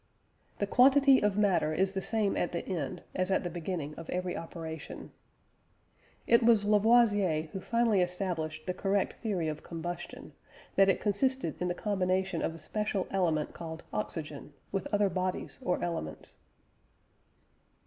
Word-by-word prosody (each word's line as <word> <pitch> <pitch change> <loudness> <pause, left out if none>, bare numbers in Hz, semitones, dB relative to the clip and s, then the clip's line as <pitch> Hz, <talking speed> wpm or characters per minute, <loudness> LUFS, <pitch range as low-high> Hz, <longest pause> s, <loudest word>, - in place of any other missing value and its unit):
"The 205 - 0
quantity 270 +4 +6
of 210 -1 +1
matter 190 -7 +2
is 190 +3 +1
the 190 - -2
same 215 -2 +1
at 175 - -1
the 170 - -3
end 160 -9 -3
as 185 0 -1
at 190 - +2
the 175 - -3
beginning 165 -3 -4
of 165 - -9
every 180 0 -2
operation." 160 -2 -7 1.1
It 235 +1 +5
was 225 -3 +4
Lavoisier 205 -7 +4
who 190 - -4
finally 230 -2 +2
established 175 -4 -2
the 180 - -1
correct 195 +1 -1
theory 195 -8 -1
of 155 -1 -4
combustion; 175 +1 -6 0.5
that 195 0 +5
it 190 - +2
consisted 220 - 0
in 180 - +1
the 175 - -1
combination 190 -3 0
of 165 - -2
a - - -9
special 205 +3 -2
element 165 -6 0
called 160 -1 -7
oxygen, 150 -8 -4 0.2
with 195 -2 -3
other 205 0 +3
bodies 185 0 -3
or 180 - 0
elements. 80 - -5
185 Hz, 150 wpm, -30 LUFS, 165-205 Hz, 1.1 s, quantity